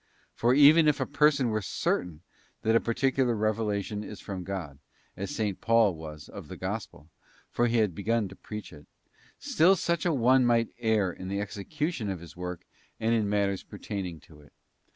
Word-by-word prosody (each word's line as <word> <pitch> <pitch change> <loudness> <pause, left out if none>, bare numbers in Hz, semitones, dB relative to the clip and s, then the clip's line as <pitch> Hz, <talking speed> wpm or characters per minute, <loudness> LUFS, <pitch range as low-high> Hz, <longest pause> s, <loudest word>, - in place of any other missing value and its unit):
For 120 +2 +2
even 150 +3 +7
if 150 - +3
a - - 0
person 145 -3 +3
were 110 -1 0
certain 90 -4 -2 0.4
that 110 +1 +3
a - - +6
particular 125 +1 +1
revelation 105 -1 -1
is 105 -1 -8
from 95 -2 -6
God, 85 -7 -6 0.4
as 100 +2 -5
S. 105 -2 +1
Paul 115 -4 +4
was 75 -2 -9
of - - -10
the - - -8
Gospel—for 85 +9 -5
he 120 0 +1
had 105 -5 +2
begun 110 +4 0
to - - -11
preach 105 -4 -8
it 75 -1 -14 0.3
— - - -29
still 180 +5 +4
such 170 -2 -1
an 160 -5 +1
one 130 +2 +5
might 115 -1 +3
err 110 -6 +1
in 95 - -8
the 100 +1 -2
execution 110 - -3
of 95 -3 -3
his 85 -1 -12
work 90 -1 -6 0.3
and 115 +1 +1
in 110 -3 +1
matters 100 -2 0
pertaining 90 -5 -6
to 75 0 -17
it. 75 - -21
105 Hz, 185 wpm, -28 LUFS, 95-120 Hz, 0.4 s, even